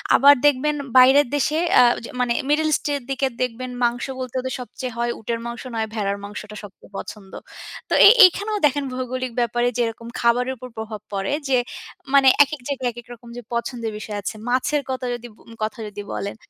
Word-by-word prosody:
আবার 280 +2 +8
দেখবেন 290 +1 +3 0.2
বাইরের 265 +2 +7
দেশে 300 +2 0 0.2
আ - - +8 0.2
যে - - -8
মানে 245 -1 +1 0.2
মিডল 310 +1 +2
ইস্ট - - 0
এর 285 - -2
দিকে 270 0 0
দেখবেন 250 +1 -3
মাংস 240 0 0
বলতে 255 -1 -6
ওদের 260 0 -4
সবচেয়ে 250 0 -6
হয় 235 0 0
উটের 230 +1 -3
মাংস, 235 0 -6
নয় 220 -1 -1
ভেড়ার 200 -2 -1
মাংসটা 210 +1 -8
সবচেয়ে 205 0 -14
পছন্দ। 195 -3 -9 0.6
তো - - -1
এ - - +11 0.2
এইখানেও 410 +4 +1
দেখেন 285 0 +1
ভৌগোলিক 255 0 -4
ব্যাপারে 240 +1 +1
যেরকম 230 -1 -2
খাবারের 245 +2 +2
উপর 255 +2 -9
প্রভাব 220 -1 -6
পড়ে 195 +4 -2 0.2
যে, 255 - +4 0.6
মানে 275 -1 +6 0.2
একেক 290 -1 -7
জায়গায় 265 -3 -1
একেক 240 0 -12
রকম 235 0 -14
যে - - -6
পছন্দের 235 -1 -3
বিষয় 210 -1 -6
আছে। 200 - -5 0.2
মাছের 280 +3 +1
কথা 260 - 0
কথা 245 - -1
যদি 240 - -11
ব - - -26 0.2
কথা 215 +1 -3
যদি 205 0 -7
বলেন, 200 +1 -4
245 Hz, 195 wpm, -22 LUFS, 225-265 Hz, 0.6 s, এ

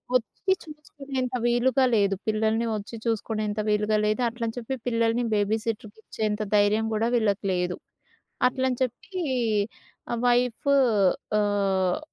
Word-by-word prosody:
వచ్చి 250 - 0
చుపించుకునేంత 275 -4 -5
వీలుగా 255 +2 +3
లేదు 200 -2 +2
పిల్లల్ని 220 +1 +1
వచ్చి 210 +2 -6
చూసుకునేంత 215 -1 -1
వీలుగా 210 +1 +2
లేదు 215 +4 +1
అట్లని 230 0 -4
చెప్పి 245 +2 -3
పిల్లల్ని 230 0 +1
బేబీసిటర్‌కి 215 +1 -2
ఇచ్చేంత 215 -1 -2
ధైర్యం 210 +2 +3
కూడా 220 +2 +1
వీళ్ళకి 215 -4 +1
లేదు. 180 0 -1 0.7
అట్లని 260 -1 -1
చెప్పి 260 - -4 1.1
వైఫు 245 +3 +2 0.7
ఆహ్, 195 -3 +1
225 Hz, 110 wpm, -26 LUFS, 210-245 Hz, 1.1 s, వీలుగా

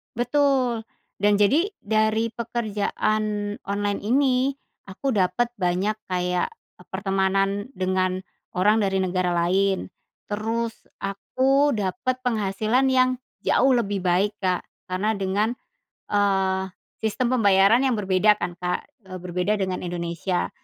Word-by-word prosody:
Betul. 245 -2 +1 0.3
Dan 205 +1 +3
jadi 295 - +3
dari 220 +1 +1
pekerjaan 215 -2 -2
online 205 0 -1
ini 260 +2 +2 0.3
aku 200 +8 -3
dapet 200 +3 +1
banyak 185 +3 0
kayak, 180 -1 0 0.3
eee, - - -17
pertemanan 195 +1 0
dengan 185 0 0 0.3
orang 210 +4 +4
dari 195 -2 +1
negara 185 -1 0
lain. 185 +3 +1 0.4
Terus, 225 +2 -2 0.3
aku 265 +8 +1
dapet 230 +5 -1
penghasilan 220 +2 +1
yang 255 0 +4 0.3
jauh 265 +1 +3
lebih 205 -5 0
baik, 190 +4 +2
Kak, 185 -2 0 0.3
karena 185 +4 0
dengan, 195 +3 0 0.6
eee, 195 -2 +2 0.4
sistem 245 +3 0
pembayaran 200 +2 +5
yang 260 - +2
berbeda 205 +1 +3
kan, 175 0 -4
Kak, 180 +7 -2 0.2
eee, 185 -1 -7
berbeda 180 +4 0
dengan 185 -2 -2
Indonesia. 175 +1 -2
205 Hz, 115 wpm, -24 LUFS, 185-230 Hz, 0.6 s, pembayaran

